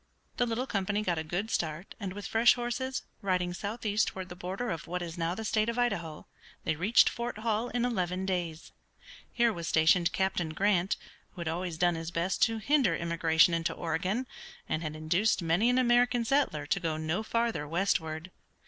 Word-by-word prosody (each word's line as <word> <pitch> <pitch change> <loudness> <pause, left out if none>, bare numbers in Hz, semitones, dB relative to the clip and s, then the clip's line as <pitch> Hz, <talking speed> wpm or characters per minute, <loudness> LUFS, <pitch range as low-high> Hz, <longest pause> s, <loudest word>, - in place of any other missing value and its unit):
The 245 - +2
little 235 +3 -1
company 205 -3 -1
got 175 -5 0
a - - -3
good 180 +7 -3
start, 160 +2 -2
and 195 -4 -4
with 205 +1 -7
fresh 230 +2 +5
horses, 250 +2 -3 0.2
riding 180 -2 0
southeast 210 +2 -1
toward 190 -1 -5
the 180 - -8
border 190 +6 -4
of 165 -2 -5
what 180 +1 -3
is 170 -1 -6
now 170 0 -1
the 220 - -5
state 215 +1 +1
of 235 - -3
Idaho, 170 -11 -1 0.4
they - - 0
reached 195 +9 +5
Fort 235 -2 -3
Hall 225 +2 -1
in 245 0 0
eleven 185 -5 -1
days. 175 -4 -3 0.6
Here 235 -2 +2
was 170 -3 -5
stationed 170 +2 +4
Captain 175 -4 -1
Grant, 195 0 +2 0.4
who 180 - -8
had 170 - -4
always 170 0 -3
done 175 +1 +3
his 165 0 -4
best 175 +2 -1
to 225 -1 -2
hinder 250 - +2
immigration 165 0 +3
into 165 0 0
Oregon, 185 +9 -1 0.4
and 155 - -1
had 155 -2 -4
induced 175 +6 +1
many 170 +8 +3
an 250 - +3
American 245 -1 +3
settler 260 - +1
to 195 - 0
go 160 -3 -2
no 155 +5 -1
farther 230 -8 -1
westward. 165 -1 -1
185 Hz, 190 wpm, -30 LUFS, 165-225 Hz, 0.6 s, fresh